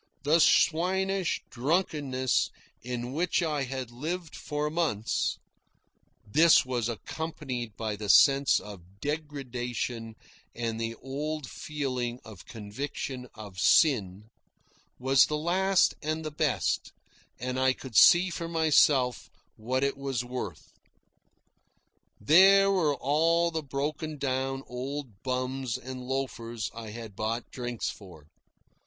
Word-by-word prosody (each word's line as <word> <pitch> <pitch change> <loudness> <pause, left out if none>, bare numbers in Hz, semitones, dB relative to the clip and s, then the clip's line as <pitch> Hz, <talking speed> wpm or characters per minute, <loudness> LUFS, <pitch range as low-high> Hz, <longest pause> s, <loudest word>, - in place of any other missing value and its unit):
The 155 +4 +4
swinish 185 +4 +2
drunkenness 135 -2 0 0.3
in 125 0 -4
which 175 +3 +1
I 150 -4 -1
had 130 -2 -5
lived 160 +7 -5
for 150 0 -3
months 150 -11 0 0.9
(this 160 +10 +5
was 120 -3 -1
accompanied 130 -3 -5
by 110 -2 -2
the 105 0 -6
sense 140 +4 +6
of 95 -2 -12
degradation 125 -6 -4 0.4
and 115 -1 -3
the 115 0 -3
old 145 +3 -4
feeling 130 -5 -4
of 105 -5 -12
conviction 125 +3 -6
of 100 -3 -9
sin) 105 - +3 0.7
was 130 +1 +4
the 150 - -1
last 185 +4 +2
and 155 +1 -3
best, 150 -4 0 0.5
and 125 +1 -3
I 130 0 +4
could 130 -2 -8
see 175 - +7
for 170 0 -4
myself 150 -6 +3 0.3
what 130 +5 -1
it 140 0 0
was 135 -3 -3
worth. 120 - -6 1.5
There 195 - +6
were 160 -7 +2
all 165 +5 +2
the 160 -1 -2
broken 150 +2 -4
down 135 0 -2
old 125 -3 -6
bums 130 -1 -2
and 130 0 -8
loafers 125 -4 -4
I 115 -1 -8
had 110 -2 -9
bought 115 +3 -3
drinks 120 -2 -3
for. 90 -7 -14
130 Hz, 115 wpm, -28 LUFS, 120-155 Hz, 1.5 s, see